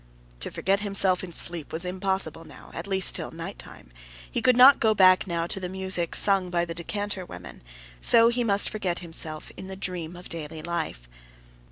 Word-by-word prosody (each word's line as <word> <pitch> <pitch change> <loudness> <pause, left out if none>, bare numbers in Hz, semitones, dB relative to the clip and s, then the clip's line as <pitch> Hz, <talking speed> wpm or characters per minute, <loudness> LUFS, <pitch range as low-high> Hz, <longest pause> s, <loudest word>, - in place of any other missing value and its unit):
To - - -4
forget 195 +2 0
himself 195 -3 +1
in 180 - -7
sleep 170 -2 +2
was 165 +3 -3
impossible 185 -3 -2
now, 155 - -15
at 165 +4 -7
least 190 -1 +3
till - - -4
nighttime; - - -10 0.4
he - - -2
could 250 -1 +3
not 260 +2 +8
go 220 -1 +2
back 185 -2 +5
now 170 -2 -2
to 195 +3 -3
the 180 -1 -5
music 190 -2 -1
sung 195 -3 +3
by 175 -1 0
the 170 - -6
decanter 205 +3 -4
women; 90 - -11 0.4
so 230 - +6
he 240 +1 -1
must 200 -3 +2
forget 190 -5 -3
himself 160 -2 -3
in 190 - -8
the 190 - -7
dream 180 -3 -5
of 180 +1 -11
daily 160 -1 -7
life. 115 - -4
185 Hz, 190 wpm, -25 LUFS, 170-195 Hz, 0.4 s, not